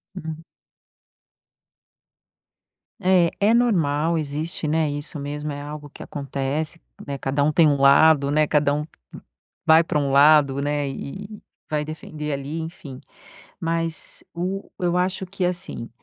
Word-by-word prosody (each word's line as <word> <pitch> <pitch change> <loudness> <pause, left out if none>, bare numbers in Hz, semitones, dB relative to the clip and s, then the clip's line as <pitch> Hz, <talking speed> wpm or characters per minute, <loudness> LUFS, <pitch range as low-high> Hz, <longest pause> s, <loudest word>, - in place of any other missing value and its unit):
Uhum. 160 -3 -6 2.6
Eh, 180 -2 +4
é 205 +3 +4
normal. 165 -9 +2
Existe, 155 +2 -3
né 155 0 +1
isso 145 +2 -4
mesmo 145 +1 -4
é 145 0 -6
algo 145 0 -8
que - - -10
acontece, 140 +2 -3 0.3
né. 140 -1 -3
Cada 140 +2 0
um 155 - +3
tem 160 +1 +5
um 145 -1 +3
lado, 140 +1 +6
né. 155 +1 +3
Cada 145 -1 +2
um 150 +1 -2 0.8
vai 160 +1 +7
pra 160 - -1
lado, 140 0 +5
né. 145 0 -1
E 140 +8 -6
e 215 - -10
e - - -38 0.3
vai 150 -1 0
defender 150 -1 -6
ali, 140 +3 -4
enfim. 155 -5 -8 0.6
Mas 165 -1 -2
o 185 +3 -3
eu 175 0 +1
acho 185 +1 0
que, 185 0 -3
assim, 175 -9 -3
150 Hz, 140 wpm, -23 LUFS, 145-165 Hz, 2.6 s, vai